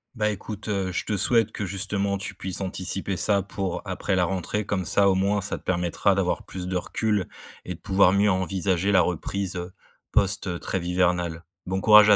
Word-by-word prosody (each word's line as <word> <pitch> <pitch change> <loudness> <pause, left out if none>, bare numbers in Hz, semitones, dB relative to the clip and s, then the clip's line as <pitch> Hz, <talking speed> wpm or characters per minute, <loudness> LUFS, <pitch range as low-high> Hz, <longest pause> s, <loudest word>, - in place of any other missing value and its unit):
Bah, 105 -2 +1
écoute, 105 +1 -5
heu, 95 -3 -1
je - - -1
te 105 - -2
souhaite 115 +2 +3
que 105 - -4
justement 100 +1 0
tu 100 0 -5
puisses 95 0 -2
anticiper 95 0 -1
ça 100 0 +3
pour 95 -2 -4
après 95 - -2
la 90 - +3
rentrée 95 +4 -2
comme 95 -3 -2
ça, 100 +2 +4
au 95 - +3
moins, 100 +2 +1
ça 100 - -2
te - - -16
permettra 90 +2 +1
d'avoir 95 -2 0
plus 90 -1 -7
de 95 - 0
recul 105 +1 -1 0.4
et 90 - -4
de - - -18
pouvoir 95 -2 +4
mieux 100 +1 +3
envisager 95 +1 0
la 90 - +6
reprise, 90 +2 -2
heu, 90 +1 -6 0.4
post, 100 0 +2
heu, 90 -1 -2
trêve 90 -1 -3
hivernale. 90 -2 0 0.2
Bon 95 +1 -2
courage 105 -1 +8
à 105 - +8
95 Hz, 205 wpm, -25 LUFS, 90-100 Hz, 0.4 s, courage